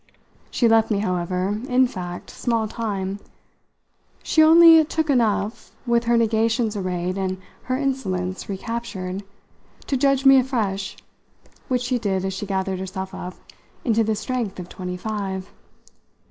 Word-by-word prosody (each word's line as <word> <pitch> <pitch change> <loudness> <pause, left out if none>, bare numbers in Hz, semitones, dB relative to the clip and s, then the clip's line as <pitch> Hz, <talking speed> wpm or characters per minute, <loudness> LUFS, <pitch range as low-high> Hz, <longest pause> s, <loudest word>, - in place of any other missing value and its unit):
She 240 - +2
left 225 -1 +4
me, 210 - +1
however, 185 +1 -1
in 255 +1 +4
fact, 180 -6 -6
small 230 -3 -1
time 205 -3 -3 1.0
she 315 - +3
only 325 0 +8
took 310 0 -1
enough, 220 -3 0
with 235 -1 +2
her 235 0 +3
negations 225 0 +1
arrayed 185 -1 -2
and 185 -1 -2 0.3
her 255 0 0
insolence 190 -11 -2
recaptured, 195 -2 -4 0.6
to 275 - -1
judge 275 0 +2
me 270 0 +8
afresh, 210 -7 -2 0.7
which 250 -1 0
she 245 0 0
did 195 -4 -1
as 190 - -2
she 195 +2 -5
gathered 190 -1 -1
herself 190 +1 -5
up 180 0 -7 0.5
into 225 -2 +3
the 220 0 0
strength 220 -3 -3
of 180 0 -7
twenty 180 -1 -5
five. 195 -2 -4
215 Hz, 140 wpm, -23 LUFS, 190-245 Hz, 1.0 s, only